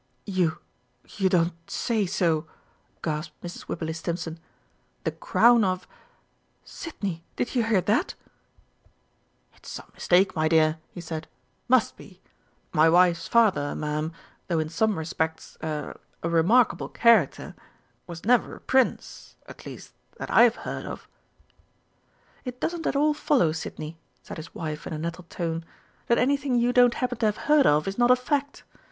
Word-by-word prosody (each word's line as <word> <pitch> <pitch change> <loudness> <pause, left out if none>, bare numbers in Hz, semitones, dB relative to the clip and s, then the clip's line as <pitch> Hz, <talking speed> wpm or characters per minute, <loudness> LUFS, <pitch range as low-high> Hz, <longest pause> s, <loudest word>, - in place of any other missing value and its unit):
"You 185 -5 0 0.5
you 190 -2 0
don't 175 -1 +2 0.2
say 220 -5 0
so!" 165 -4 0 0.6
gasped 155 -1 -4
Mrs. 175 0 -8
Wibberley 160 -1 -3
Stimpson. 165 0 -4 0.6
"The - - 0
Crown 240 - +4
of 185 -1 -1 0.8
Sidney, 195 - -6
did - - -2
you 245 -3 +2
hear 220 -4 +3
that." 230 - 0 1.4
"It's - - -14
some - - -9
mistake, 190 +2 +2
my 155 -1 +2
dear," 160 0 +3
he 175 - -9
said. 160 -1 -6 0.4
"Must - - +3
be!... - - -15 0.5
My 155 +1 +5
wife's 170 0 +4
father, 205 -11 +3
Ma'am, 150 +1 -2 0.4
though 170 - 0
in 155 -1 -1
some 210 +5 +1
respects 160 0 -3
a 155 -2 -4 0.3
a 170 - 0
remarkable 185 +9 +3
character, 225 - +3 0.5
was 170 0 -9
never 245 +1 +3
a - - -13
Prince 260 -1 0
at - - -11
least - - -10 0.2
that - - -6
I've 235 0 +6
heard - - -5
of." - - -8 1.4
"It 250 -1 -7
doesn't 335 -1 -2
at - - 0
all 300 +2 +3
follow, 260 - +2
Sidney," 160 0 -6 0.2
said - - -8
his 160 +1 -10
wife 155 -2 -5
in - - -5
a - - -3
nettled 170 +2 -5
tone, 165 -1 -3 0.4
"that 235 - +3
anything 275 0 +1
you 240 +1 +2
don't 245 -1 +5
happen 250 -2 -2
to 225 - +3
have 210 - -1
heard 295 -2 +5
of 150 +3 +3
is 195 +4 -3
not 240 0 +4
a 250 - +8
fact. 285 +3 -2
180 Hz, 155 wpm, -26 LUFS, 160-240 Hz, 1.4 s, a